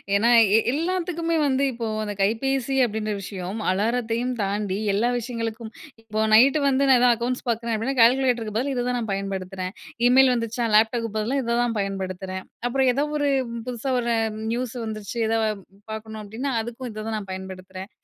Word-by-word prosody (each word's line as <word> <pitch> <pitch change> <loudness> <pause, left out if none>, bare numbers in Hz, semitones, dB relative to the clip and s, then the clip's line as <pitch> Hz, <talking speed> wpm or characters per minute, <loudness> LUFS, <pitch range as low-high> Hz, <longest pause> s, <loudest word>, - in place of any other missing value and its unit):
ஏன்னா 225 +4 +3 0.3
எ - - +6
எல்லாத்துக்குமே 335 0 -1
வந்து 270 +1 +1
இப்போ 230 -1 -4 0.2
அந்த 210 -1 -3
கைபேசி 270 +5 0
அப்பிடின்ற 215 -1 -2
விஷயம் 190 +2 -5
அலாரத்தையும் 230 +4 0
தாண்டி 200 -1 -1 0.2
எல்லா 220 +5 +2
விஷயங்களுக்கும், 230 -1 -5 0.3
இப்போ 215 -1 -2
நைட்டு 270 +7 +6
வந்து 275 0 +2
நான் 250 -1 +5
தான் 240 - +6
அக்கவுண்ட்ஸ் 245 +3 -3
பார்க்குறேன் 230 0 -1
அப்பிடின்னா 255 +5 -2
கால்குலேட்டருக்கு 240 -3 +3
பதில் 275 +3 -1
இத 245 0 -1
தான் 250 - 0
நான் 225 -3 -3
பயன்படுத்துறேன். 190 -1 -4 0.3
இமெயில் 255 0 +6
வந்துச்சா, 230 +1 -2
லேப்டாப்புக்கு 225 +1 +3
பதிலா 240 +6 0
இத 235 0 0
தான் 235 -1 -1
பயன்படுத்துறேன். 190 -1 -4 0.2
அப்புறம் 265 +1 +2
ஏதோ 280 +4 +1
ஒரு 290 -1 +1 0.4
புதுசா 250 +2 -3
ஒரு 235 -1 0 0.4
நியூஸ் 245 0 -3
வந்துச்சு. 215 0 -6
எதா 225 0 +1 0.5
பார்க்கணும் 220 0 -6
அப்பிடின்னா, 235 +7 -4
அதுக்கும் 240 +2 -6
இத 215 - -7
தான் 220 - -2
நான் 195 -2 -10
பயன்படுத்துறேன். 190 0 -8
230 Hz, 165 wpm, -24 LUFS, 210-250 Hz, 0.5 s, எ